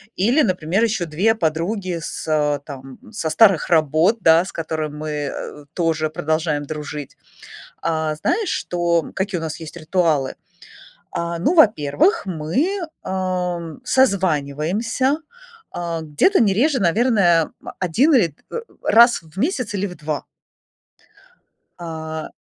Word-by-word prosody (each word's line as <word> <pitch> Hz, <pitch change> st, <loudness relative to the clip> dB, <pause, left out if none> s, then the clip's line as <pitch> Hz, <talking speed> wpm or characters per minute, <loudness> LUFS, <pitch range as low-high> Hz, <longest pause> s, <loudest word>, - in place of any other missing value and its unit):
Или, 240 Hz, +11 st, +3 dB
например, 185 Hz, +1 st, 0 dB
ещё 205 Hz, -6 st, -1 dB
2 190 Hz, +9 st, +1 dB
подруги 170 Hz, +1 st, -1 dB
с 150 Hz, -2 st, -1 dB
там, 135 Hz, -2 st, -10 dB
со 170 Hz, -7 st, -3 dB
старых 190 Hz, +1 st, +4 dB
работ, 160 Hz, +6 st, +3 dB
да, 165 Hz, +2 st, +5 dB
с -, -, -9 dB
которыми 155 Hz, -2 st, -3 dB
мы 150 Hz, -1 st, -5 dB
тоже 160 Hz, -3 st, 0 dB
продолжаем 155 Hz, -1 st, -1 dB
дружить. 150 Hz, -1 st, -7 dB, 0.7 s
А, 160 Hz, -2 st, 0 dB
знаешь, 405 Hz, -, -1 dB
что, 170 Hz, -2 st, 0 dB
какие 190 Hz, -2 st, -2 dB
у -, -, -7 dB
нас 160 Hz, 0 st, -4 dB
есть 160 Hz, +1 st, -9 dB
ритуалы? 155 Hz, -4 st, 0 dB, 0.8 s
А, 170 Hz, -1 st, -3 dB
ну, 285 Hz, -, +1 dB
во-первых, 225 Hz, -, +3 dB
мы, 190 Hz, -, -1 dB, 0.2 s
ам, 180 Hz, -1 st, -3 dB
созваниваемся, 200 Hz, -, +1 dB, 0.5 s
а, 170 Hz, -1 st, -4 dB
где-то 160 Hz, -, +2 dB
не 200 Hz, -4 st, +3 dB
реже, 270 Hz, +5 st, +2 dB
наверное, 185 Hz, -4 st, +3 dB
м, -, -, -8 dB
1 235 Hz, -, +3 dB
или, 170 Hz, -, +3 dB, 0.2 s
э, 470 Hz, -, -3 dB, 0.2 s
раз 235 Hz, +2 st, +5 dB
в 160 Hz, +3 st, -15 dB
месяц 250 Hz, -, -1 dB
или 200 Hz, +1 st, -1 dB
в 180 Hz, -, -8 dB
2. 150 Hz, -1 st, -4 dB, 1.5 s
А. 160 Hz, -2 st, -6 dB
170 Hz, 125 wpm, -21 LUFS, 155-210 Hz, 1.5 s, да